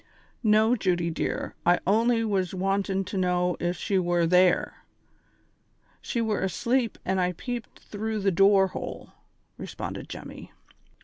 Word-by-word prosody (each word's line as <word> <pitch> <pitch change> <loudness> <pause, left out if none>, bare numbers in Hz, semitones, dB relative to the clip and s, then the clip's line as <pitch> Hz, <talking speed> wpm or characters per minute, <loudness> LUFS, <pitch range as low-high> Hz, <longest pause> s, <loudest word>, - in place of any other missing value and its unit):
"Xo, 220 +2 +4
Judy 175 -3 0
dear, 160 - -3
I 175 +1 +4
only 230 +4 +3
was 190 -3 -1
wantin' 195 +1 0
to 195 - -5
know 180 -1 +1
if 175 0 -1
she 195 +2 0
were 175 -1 +1
there. 180 +1 +2 1.2
Slie 235 -2 -2
were 215 -2 -1
asleep 235 +6 0
when 190 0 0
I 180 0 +1
peeped 240 +5 -6
through 215 0 -4
the 195 0 +2
door 195 +1 +4
hole," - - -7 0.5
responded - - -6
Jemmy. - - -9
195 Hz, 135 wpm, -26 LUFS, 180-215 Hz, 1.2 s, Xo